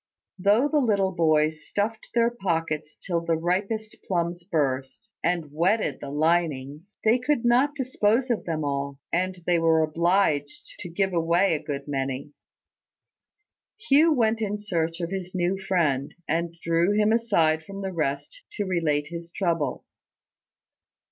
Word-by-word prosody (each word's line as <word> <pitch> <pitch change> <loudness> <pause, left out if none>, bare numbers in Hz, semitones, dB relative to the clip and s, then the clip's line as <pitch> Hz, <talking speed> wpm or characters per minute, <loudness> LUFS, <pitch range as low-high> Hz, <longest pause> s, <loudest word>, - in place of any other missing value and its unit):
Though 205 +8 +4
the 300 0 +2
little 200 -7 +2
boys 155 -3 +2
stuffed 215 +2 -3
their 235 0 +3
pockets 165 -8 -2
till 170 -3 -2
the 165 -1 0
ripest 195 +6 -2
plums 175 -1 -1
burst, 145 +1 -2
and 170 -4 0
wetted 170 -1 +1
the 140 - -7
linings, 155 +2 -1
they 225 +3 +4
could 250 -1 0
not 255 +5 +3
dispose 250 -2 +1
of 230 - -1
them 160 -2 -2
all; 140 0 -2 0.2
and 185 0 -1
they 175 -1 +3
were 160 -1 +4
obliged 155 -2 0
to 175 - -7
give 190 +2 0
away 170 +3 +2
a 155 - -1
good 145 -2 -5
many. 135 0 -3 1.5
Hugh 320 -5 +4
went 230 -5 +2
in 210 -1 -2
search 170 -4 -2
of 170 +1 -3
his 190 -1 -5
new 180 +2 0
friend, 160 -8 0
and 170 +2 -1
drew 170 +4 +2
him 210 +1 +3
aside 170 -9 +2
from 195 +5 -8
the 190 -1 -3
rest 155 - -3
to 205 - -2
relate 155 -5 0
his 170 0 -7
trouble. 165 -7 -1
175 Hz, 150 wpm, -25 LUFS, 155-205 Hz, 1.5 s, Though